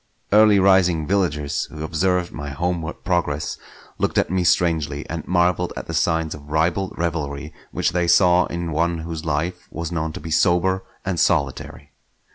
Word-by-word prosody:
Early 105 Hz, 0 st, +6 dB
rising 95 Hz, -4 st, +4 dB
villagers 75 Hz, -6 st, 0 dB
who 75 Hz, 0 st, -8 dB
observed 90 Hz, +2 st, 0 dB
my 75 Hz, -1 st, -6 dB
homeward 85 Hz, +2 st, -3 dB
progress 80 Hz, -5 st, -1 dB, 0.4 s
looked -, -, 0 dB
at -, -, +2 dB
me 95 Hz, -1 st, +1 dB
strangely, 80 Hz, -5 st, +1 dB
and 80 Hz, -2 st, -5 dB
marvelled 90 Hz, 0 st, +1 dB
at -, -, -5 dB
the -, -, -6 dB
signs 80 Hz, -1 st, +1 dB
of 75 Hz, -1 st, -12 dB
ribald 85 Hz, +5 st, 0 dB
revelry 75 Hz, -3 st, -3 dB, 0.2 s
which -, -, 0 dB
they 90 Hz, 0 st, 0 dB
saw 90 Hz, 0 st, +5 dB
in 85 Hz, -1 st, -4 dB
one 85 Hz, +2 st, 0 dB
whose 80 Hz, -1 st, -6 dB
life 85 Hz, +4 st, -2 dB
was 85 Hz, 0 st, -5 dB
known 80 Hz, -2 st, -2 dB
to -, -, -6 dB
be 80 Hz, +1 st, -8 dB
sober 90 Hz, +3 st, +2 dB, 0.2 s
and 95 Hz, -3 st, -1 dB
solitary. 70 Hz, -1 st, -1 dB
85 Hz, 165 wpm, -22 LUFS, 80-90 Hz, 0.4 s, Early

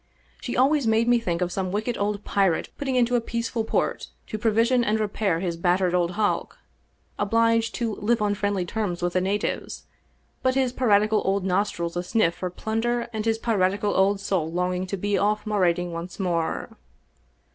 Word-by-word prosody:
She 245 Hz, -, -4 dB
always 275 Hz, 0 st, +3 dB
made 225 Hz, +1 st, +3 dB
me 240 Hz, 0 st, +4 dB
think 180 Hz, -5 st, -1 dB
of 180 Hz, -, -3 dB
some 185 Hz, -1 st, -2 dB
wicked 220 Hz, +4 st, -1 dB
old 205 Hz, 0 st, -2 dB
pirate 195 Hz, -5 st, +1 dB
putting 270 Hz, -2 st, -2 dB
into 245 Hz, -1 st, +2 dB
a 240 Hz, -, +2 dB
peaceful 230 Hz, 0 st, -2 dB
port -, -, -1 dB, 0.2 s
to 215 Hz, -, -5 dB
provision 230 Hz, +3 st, +3 dB
and 220 Hz, -1 st, +1 dB
repair 205 Hz, -4 st, 0 dB
his 175 Hz, -3 st, -2 dB
battered 180 Hz, +1 st, +1 dB
old 175 Hz, 0 st, +1 dB
hulk, 210 Hz, +1 st, -1 dB, 0.6 s
obliged 230 Hz, +1 st, +2 dB
to 230 Hz, -3 st, -1 dB
live 230 Hz, +3 st, +1 dB
on 210 Hz, -1 st, +1 dB
friendly 200 Hz, -2 st, -1 dB
terms 180 Hz, -3 st, -3 dB
with 175 Hz, 0 st, 0 dB
the 185 Hz, -, +2 dB
natives, 200 Hz, +3 st, -2 dB, 0.6 s
but 260 Hz, 0 st, +1 dB
his 260 Hz, -2 st, +1 dB
piratical 215 Hz, -3 st, +3 dB
old 195 Hz, 0 st, 0 dB
nostrils 180 Hz, -3 st, -1 dB
asniff 175 Hz, 0 st, +1 dB
for 180 Hz, +1 st, -4 dB
plunder 230 Hz, +5 st, -2 dB
and 215 Hz, 0 st, -3 dB
his 225 Hz, -1 st, +1 dB
piratical 205 Hz, -2 st, +1 dB
old 195 Hz, +1 st, +3 dB
soul 180 Hz, -5 st, -1 dB
longing 180 Hz, +1 st, -1 dB
to 195 Hz, -, -3 dB
be 205 Hz, +2 st, 0 dB
off 210 Hz, +1 st, +1 dB
marauding 180 Hz, -4 st, +1 dB
once 170 Hz, +3 st, -7 dB
more. 170 Hz, -4 st, -1 dB
205 Hz, 180 wpm, -25 LUFS, 180-225 Hz, 0.6 s, me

